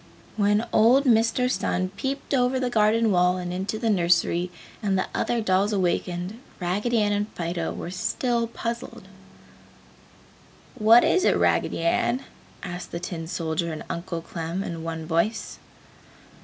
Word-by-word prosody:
When 205 +1 +2
old 245 +6 +5
Mister 230 +1 +3
Sun 185 -7 -1
peeped 270 +9 -4
over 255 0 +2
the 250 -1 -1
garden 220 0 +3
wall 180 0 +3
and 180 -1 -4
into 190 +4 -3
the 225 0 0
nursery, 175 -1 +2 0.3
and 195 -2 +1
the 185 - 0
other 240 -1 0
dolls 200 +1 +2
awakened, 180 +1 -1 0.2
Raggedy 205 +7 0
Ann 205 - +1
and 205 0 0
Fido 170 -1 -2
were 175 - -6
still 235 +5 -1
puzzled. 235 +1 -5 1.7
"What 230 -1 +6
is 370 - +3
it, - - +3
Raggedy - - +1
Ann?" 240 +9 +1 0.4
asked 175 0 -6
the 170 - -4
tin 170 -2 -5
soldier 165 -1 -2
and 155 - -6
Uncle 170 -1 -4
Clem, 170 +3 -4
in 165 -3 -5
one 165 -1 -4
voice. 170 +7 -1
195 Hz, 145 wpm, -25 LUFS, 175-230 Hz, 1.7 s, What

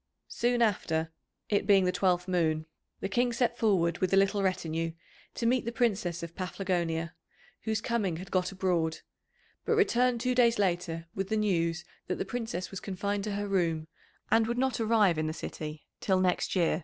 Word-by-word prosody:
Soon 240 0 +1
after, 165 -7 0 0.4
it 200 -1 +1
being 195 -3 +6
the 180 - +2
twelfth 180 -1 +1
moon, 160 -4 +1 0.4
the - - -1
King 240 +5 +1
set 240 0 +1
forward 180 -7 +2
with 185 - 0
a 195 - +4
little 195 +1 +3
retinue 165 -3 -1 0.4
to 235 - -2
meet 250 +2 +3
the 235 - -3
Princess 195 -9 0
of 170 0 -6
Paphlagonia, 175 -3 -2 0.5
whose 220 -1 0
coming 210 -9 -1
had 185 +3 -9
got 185 0 +1
abroad; 175 -4 0 0.6
but 455 - +1
returned 250 - +3
two 250 +2 +1
days 240 -2 +4
later 175 -4 0
with 195 0 -3
the 220 - +1
news 170 -5 0 0.2
that 180 - -1
the - - -3
Princess 225 -7 -4
was 195 - -5
confined 200 +1 -2
to 210 - -2
her 205 0 -2
room, 165 -5 0 0.4
and 225 -1 +4
would 240 +1 -1
not 260 -2 +1
arrive 215 -7 +3
in 155 - 0
the 155 - -2
city 155 -1 -6
till 190 -2 +2
next 185 +1 +1
year. 170 -3 +2
190 Hz, 185 wpm, -30 LUFS, 170-220 Hz, 0.6 s, being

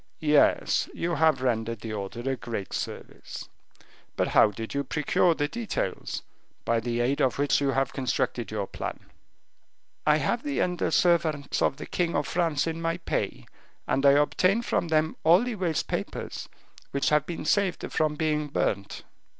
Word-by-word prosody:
"Yes, 150 -1 +3
you 175 +1 -1
have 155 -5 +3
rendered 115 -3 -1
the 110 -1 -5
order 105 +5 -5
a 135 - +1
great 115 -7 -5
service. - - -6 0.7
But - - 0
how - - +6
did 110 +2 -6
you 140 0 0
procure 155 +4 +2
the 145 -1 0
details, 230 +6 -3 0.4
by 115 0 +2
the 120 +1 -1
aid 135 +5 +1
of 130 -3 +2
which 145 0 +2
you 140 - +2
have 135 -1 0
constructed 125 -2 -1
your 105 -2 -2
plan?" - - -6 1.1
"I 150 0 +6
have 230 +9 0
the 290 0 -2
under 180 -1 0
servants 160 -5 +2
of 135 - +2
the - - -7
king 170 -1 -1
of 145 - +1
France 165 -4 +1
in 165 0 -3
my 165 0 0
pay, 175 - -3 0.4
and 135 - +1
I 140 -1 +7
obtain 185 +9 +3
from 175 - 0
them 160 0 +1
all 170 +7 +6
the 245 -1 -2
waste 180 -6 -1
papers, - - -4 0.4
which 140 - 0
have 150 -1 +2
been 170 -3 -5
saved 195 +1 +1
from 155 -1 +1
being 150 -1 0
burnt." 100 -8 -2
150 Hz, 170 wpm, -27 LUFS, 130-165 Hz, 1.1 s, I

